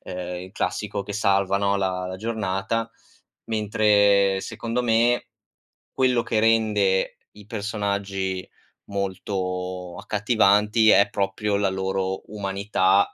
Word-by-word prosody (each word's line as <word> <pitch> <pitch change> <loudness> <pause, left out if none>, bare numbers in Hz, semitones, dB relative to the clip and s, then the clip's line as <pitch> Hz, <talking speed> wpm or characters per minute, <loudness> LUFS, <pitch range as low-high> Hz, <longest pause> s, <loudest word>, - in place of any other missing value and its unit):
uhm, - - -8 0.3
il 95 +1 -11
classico 100 +1 -2
che 100 +1 -7
salva, 100 -2 +2
no, 100 0 +1
la 95 -2 -1
la 95 0 -5
giornata, 110 +1 -2 0.5
mentre 105 -2 +3
secondo 120 +1 -3
me, 120 +1 +2 0.6
quello 125 -2 +2
che 110 - 0
rende 105 -4 +2 0.3
i 105 - -13
personaggi 100 -3 -3 0.4
molto 90 -2 -4
accattivanti 105 +1 +3
è 100 - +6
proprio 100 +1 -1
la 100 -1 +1
loro 95 0 -2
umanità, 100 -1 +1
100 Hz, 110 wpm, -24 LUFS, 95-110 Hz, 0.6 s, è